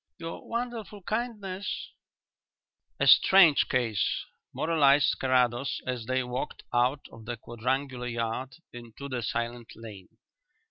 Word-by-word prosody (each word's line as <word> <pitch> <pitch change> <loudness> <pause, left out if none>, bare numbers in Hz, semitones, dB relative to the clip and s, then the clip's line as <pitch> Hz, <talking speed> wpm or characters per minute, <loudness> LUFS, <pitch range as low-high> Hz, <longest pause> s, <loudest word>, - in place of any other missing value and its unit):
Your 165 0 -8
wonderful 230 -4 -4
kindness 210 -3 -4 0.5
" - - -54
"A - - +2
strange 175 -7 +7
case," 120 -5 0 0.3
moralized 150 -3 +3
Carrados, 130 0 +1
as 125 -3 -4
they 130 0 +1
walked 125 +1 -5
out 125 +4 +1
of 110 -1 -13
the 120 +1 -4
quadrangular 125 +3 -3
yard 115 +2 -3 0.2
into 120 +3 -9
the 130 -3 -3
silent 120 +1 -3
lane. 105 -5 -11
130 Hz, 120 wpm, -28 LUFS, 120-160 Hz, 0.5 s, strange